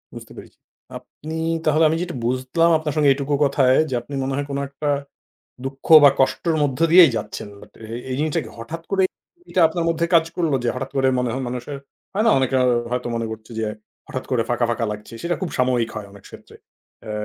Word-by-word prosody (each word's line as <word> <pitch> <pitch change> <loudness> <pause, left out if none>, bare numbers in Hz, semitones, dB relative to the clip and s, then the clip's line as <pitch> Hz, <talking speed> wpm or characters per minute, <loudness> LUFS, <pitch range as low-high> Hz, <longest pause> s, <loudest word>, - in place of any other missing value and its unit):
বুঝতে - - -10
পেরেছি। - - -13 0.4
আপনি 160 +2 -9 0.3
তাহলে, 155 +1 +3
আমি 160 - 0
যেটা 175 -5 -4
বুঝলাম 130 +7 +1
আপনার 155 -2 -3
সঙ্গে 150 -2 +4
এইটুকু 140 +1 -3
কথায়, 135 -2 +3
যে - - -4
আপনি 140 +4 -12
মনে 135 0 -2
হয় 145 0 -2
কোন 140 - -3
একটা 145 +1 -4 0.8
দুঃখ 135 0 -7 0.2
বা, 140 - +10
কষ্টের 160 +4 +1
মধ্য 135 0 -2
দিয়েই 170 -6 +8
যাচ্ছেন। 105 - -6
But 105 - -15
এ - - -11 0.2
এই 130 - -2
জিনিসটা 155 0 0
কি - - -10
হঠাৎ 160 +8 -7
করে 195 -1 +2 0.5
এটা 180 - +1
আপনার 170 +1 -3
মধ্যে 165 0 0
কাজ 165 -1 +5
করল? 165 -5 0
যে - - -1
হঠাৎ 135 +1 -5
করে 135 -1 +2
মনে 125 -1 -1
হয় 130 0 -3
মানুষের, 125 +3 -5 0.4
হয় 215 +3 +1
না 225 - +5
অনেকের 130 0 +1 0.3
হয়তো 125 -1 -2
মনে 115 0 -2
করছে 110 +1 -9
যে, 110 - -1 0.4
হঠাৎ 130 - -5
করে 120 -3 +2
ফাঁকা, 120 0 +1
ফাঁকা 115 0 -1
লাগছে। 105 +2 -8
সেটা 175 0 0
খুব 185 - -2
সাময়িক 125 -3 +1
হয় 105 -2 -6
অনেক 100 -1 -15
ক্ষেত্রে। - - -14 0.5
এ - - -7
135 Hz, 210 wpm, -21 LUFS, 125-160 Hz, 0.8 s, বা